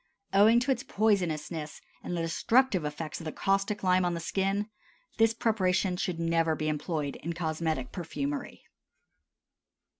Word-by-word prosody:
Owing 215 +4 +6
to 265 +2 +1
its 250 -2 0
poisonousness 175 - -1 0.2
and 175 - -3
the 165 - -1
destructive 210 +4 +2
effects 150 +2 -5
of - - -9
the 155 - -3
caustic 195 +3 0
lime 185 0 +4
on 175 -1 0
the - - -3
skin, 195 +4 -1 0.5
this 225 0 +4
preparation 190 -5 +1
should 180 -2 -2
never 165 -1 +2
be 155 0 -2
employed 150 -2 -2
in 170 +2 -4
cosmetic 160 -5 -2
perfumery. 145 -5 -4
175 Hz, 145 wpm, -29 LUFS, 160-200 Hz, 0.5 s, Owing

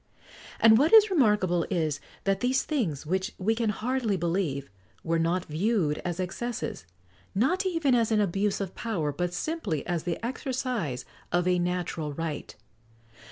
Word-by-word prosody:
And 225 0 +7
what 300 +6 +3
is 430 -2 +8
remarkable 210 - +3
is, 155 -6 0 0.2
that 195 -1 +1
these 255 +3 +1
things, 195 - -2
which 190 +6 -1
we 210 +4 +1
can 225 -1 0
hardly 225 -1 0
believe, 165 -5 -1 0.4
were 165 0 +1
not 170 +2 +1
viewed 165 -1 0
as 175 0 -4
excesses, 195 - -4 0.5
not 350 - +2
even 330 -7 +1
as 230 -2 +2
an 215 - +3
abuse 200 +1 +1
of 195 -2 -4
power, 175 -11 -2
but 175 +5 -2
simply 195 - -2
as 175 -2 -1
the 170 0 -2
exercise 245 - -2 0.3
of 175 0 +2
a 180 -1 +3
natural 175 -4 -2
right. 160 -1 -5
190 Hz, 155 wpm, -28 LUFS, 165-235 Hz, 0.5 s, is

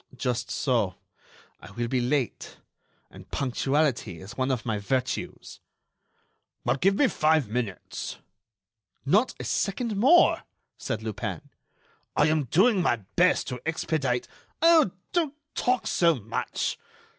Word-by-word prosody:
"Just 125 -1 -2
so; 115 - 0 0.6
I - - -12
will 120 +1 -2
be 125 +1 0
late. 125 0 -2 0.5
And - - -14
punctuality 135 - 0
is 95 +7 -10
one 130 0 0
of 125 -3 -1
my 110 -3 -1
virtues." 130 +5 -3 1.1
"Well, - - +2
give 195 +7 +3
me 280 - +4
five 155 - +2
minutes." 110 -3 -4 0.9
"Not 210 - +3
a - - -4
second 215 +2 -1
more," 275 - +5 0.3
said 110 0 -4
Lupin. 110 -2 -5 0.6
"I 150 - +4
am 155 -2 +1
doing 190 - +3
my 170 - +3 0.2
best 180 +1 +3
to 125 -2 -5
expedite——" 155 -6 -1 0.3
"Oh! 330 - +6 0.2
don't 320 -5 0 0.2
talk 250 0 0
so 170 -2 +3
much.... 100 - -3
135 Hz, 125 wpm, -27 LUFS, 120-185 Hz, 1.1 s, Oh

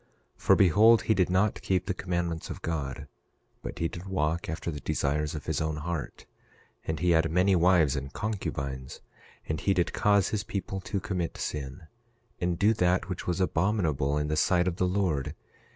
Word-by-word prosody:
11:2 - - -23
For - - +5
behold, 105 +5 +6
he 110 - +3
did 90 -4 +2
not 95 +3 +1
keep 90 -1 0
the 95 - -1
commandments 85 -3 -3
of - - -7
God, 75 -6 -3 0.5
but - - -7
he 85 - 0
did 85 +3 -8
walk 85 -2 -1
after 80 +1 -3
the 75 - -6
desires 75 +2 -1
of 75 - -6
his - - -1
own 80 -1 -1
heart. 80 0 -5 0.6
And 80 -1 -2
he 90 +2 +2
had 80 0 +3
many 90 +4 +3
wives 85 -5 +4
and 70 0 -4
concubines. 70 -11 -4 0.5
And 80 0 -2
he 100 - +2
did 85 - 0
cause 100 -2 +3
his 105 -2 -2
people 95 -2 -4
to 100 - -3
commit 90 -3 -3
sin, 70 +3 -5 0.6
and 90 -1 0
do 105 +5 +4
that 90 -2 +1
which 90 - -5
was 90 +1 0
abominable 80 -7 +1
in 75 0 -1
the 75 - 0
sight 90 +3 +2
of 90 -1 -1
the 90 - +1
Lord. 90 -7 -1
85 Hz, 190 wpm, -28 LUFS, 75-95 Hz, 0.6 s, behold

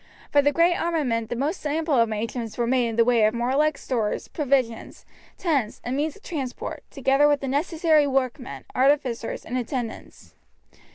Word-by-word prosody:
For 290 - +5
the 290 +1 +3
great 335 +3 +4
armament 265 -10 -1
the - - -2
most 290 +9 -2
ample 305 -2 +1
arrangements 225 +1 -2
were 240 - +1
made 245 0 +2
in 225 - -3
the 230 0 +4
way 235 -2 +3
of 215 +2 +1
warlike 270 +6 +1
stores, 225 -5 -2
provisions, 265 -6 -1 0.3
tents, 280 - -1
and 245 +2 -2
means 295 +2 -1
of 410 - -18
transport, 275 -8 -5
together 275 +1 +3
with 290 -1 +3
the 275 - -3
necessary 310 +1 +2
workmen, 260 -1 -2
artificers, 260 -3 +1
and 255 +2 -2
attendants. 240 -1 -6
265 Hz, 165 wpm, -24 LUFS, 235-295 Hz, 0.3 s, For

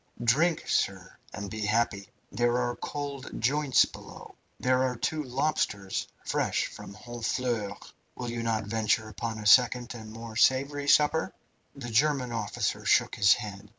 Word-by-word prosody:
Drink, 155 +8 +2
sir, 95 -1 -1 0.2
and 100 0 -6
be 110 - -5
happy! 105 -2 0 0.2
There 120 0 +1
are 120 -1 -1
cold 140 -2 -6
joints 140 +3 +3
below. - - -12 0.3
There 130 0 +2
are 130 -1 0
two 155 +6 -2
lobsters, 125 -8 -1 0.2
fresh - - 0
from 100 - -10
Honfleur. 115 -2 -3 0.4
Will 120 -1 -5
you 120 0 -3
not 115 -1 0
venture 110 +1 0
upon 110 +2 -4
a 105 - -7
second 125 +2 +5
and 110 -2 -9
more 115 0 -9
savoury 140 +4 +2
supper?" 150 +2 +3 0.4
The 125 -4 -7
German 135 +1 +2
officer 110 -3 -2
shook - - +3
his 100 0 +5
head. 105 -2 -8
120 Hz, 150 wpm, -28 LUFS, 110-130 Hz, 0.4 s, second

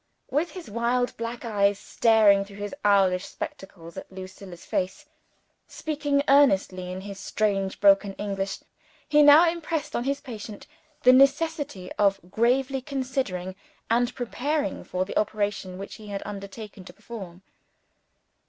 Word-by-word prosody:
With 300 +5 +1
his 365 -3 -9
wild 235 +3 0
black 230 +1 -5
eyes 200 -3 +2
staring 215 -3 +4
through 200 0 -13
his 205 0 -5
owlish 195 -3 +4
spectacles 170 -3 -8
at - - -8
Lucilla's 185 -1 -10
face, 185 +1 -2 0.6
speaking 290 -2 -1
earnestly 190 -10 +3
in 185 +1 -5
his 200 0 -8
strange 195 -3 -1
broken 200 0 +5
English, 195 -1 -4 0.5
he 300 0 +5
now 295 +4 +8
impressed 325 -3 -2
on 240 - -1
his 280 +1 0
patient 215 -4 -9 0.4
the 255 - +8
necessity 275 - +2
of 200 -1 +3
gravely 260 +5 +1
considering, 255 -9 -3 0.4
and 240 +1 +2
preparing 255 0 -2
for, 185 0 -2
the 200 - -1
operation 205 -3 -2
which 195 +1 -7
he 215 - -12
had 200 -1 -5
undertaken 200 0 -8
to 180 - -11
perform. 190 -4 -10
210 Hz, 135 wpm, -26 LUFS, 195-265 Hz, 0.6 s, now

